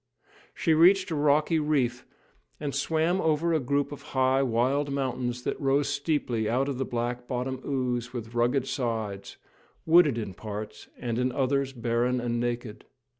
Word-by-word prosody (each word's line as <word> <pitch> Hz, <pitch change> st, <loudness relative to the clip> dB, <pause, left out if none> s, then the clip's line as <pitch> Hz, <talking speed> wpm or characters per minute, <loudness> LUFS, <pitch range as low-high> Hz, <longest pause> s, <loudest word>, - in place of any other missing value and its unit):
She 165 Hz, -, +2 dB
reached 185 Hz, +3 st, +5 dB
a -, -, 0 dB
rocky 150 Hz, +2 st, +3 dB
reef, 130 Hz, -5 st, 0 dB, 0.5 s
and 145 Hz, -2 st, -3 dB
swam 160 Hz, +6 st, +1 dB
over 160 Hz, +1 st, +1 dB
a 160 Hz, -, +3 dB
group 140 Hz, +2 st, 0 dB
of 145 Hz, -, -8 dB, 0.2 s
high, 130 Hz, +1 st, +3 dB
wild 135 Hz, +3 st, +1 dB
mountains 125 Hz, -3 st, -2 dB
that -, -, -3 dB
rose 140 Hz, +1 st, +2 dB
steeply 140 Hz, -7 st, -1 dB
out 130 Hz, +4 st, +1 dB
of 135 Hz, -3 st, -3 dB
the 135 Hz, -, 0 dB
black 120 Hz, +1 st, -3 dB
bottom 130 Hz, 0 st, -3 dB
ooze 125 Hz, -3 st, -2 dB
with 115 Hz, -2 st, -7 dB
rugged 120 Hz, +3 st, +1 dB
sides, 110 Hz, -6 st, -3 dB, 0.5 s
wooded 160 Hz, -6 st, +5 dB
in 105 Hz, -4 st, -4 dB
parts, 105 Hz, +2 st, -7 dB
and 120 Hz, -1 st, -3 dB
in 125 Hz, +1 st, +1 dB
others 135 Hz, +1 st, 0 dB
barren 120 Hz, 0 st, 0 dB
and 120 Hz, -1 st, -1 dB
naked. 120 Hz, -2 st, -4 dB
130 Hz, 160 wpm, -27 LUFS, 120-145 Hz, 0.5 s, reached